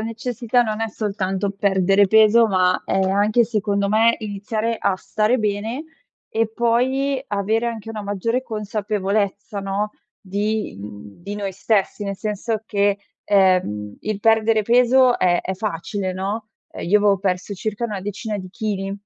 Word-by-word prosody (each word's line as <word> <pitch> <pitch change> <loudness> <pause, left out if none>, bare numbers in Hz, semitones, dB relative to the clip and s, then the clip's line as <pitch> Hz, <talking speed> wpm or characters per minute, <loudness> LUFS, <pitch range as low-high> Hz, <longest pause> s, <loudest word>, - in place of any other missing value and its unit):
necessità 235 +2 0
non 215 -1 -3
è 225 - 0
soltanto 200 -2 -2
perdere 195 0 +3
peso, 220 +2 +6
ma 185 -1 +2
è 195 - 0
anche, 205 +5 +3
secondo 205 -3 0
me, 225 +2 +4
iniziare 215 +2 -3
a 190 - +1
stare 215 +6 0
bene, 220 +7 -2 0.4
e 225 0 0
poi, 255 +4 +1
avere 215 +3 0
anche 225 -2 -6
una 215 -2 -5
maggiore 215 +5 -1
consapevolezza, 205 -2 -2
no, 195 +2 -2 0.3
di 205 - -2
mhmm, 105 +5 -11
di 205 +3 -5
noi 200 -2 -3
stessi. 205 +1 0
Nel 200 -1 -3
senso 215 +1 -2
che, 200 -1 +1 0.2
ehm, 185 - +2
il 215 -1 -3
perdere 220 0 +3
peso 250 +2 +4
è 175 -1 +2
è 190 - -4
facile, 190 0 -3
no, 205 +4 -4 0.3
io 205 +5 +3
avevo 200 -2 +3
perso 190 +1 -2
circa 215 +4 -3
una 210 -4 -3
decina 205 +2 -4
di 185 -1 -7
chili, 195 -1 -3
210 Hz, 150 wpm, -21 LUFS, 195-225 Hz, 0.4 s, peso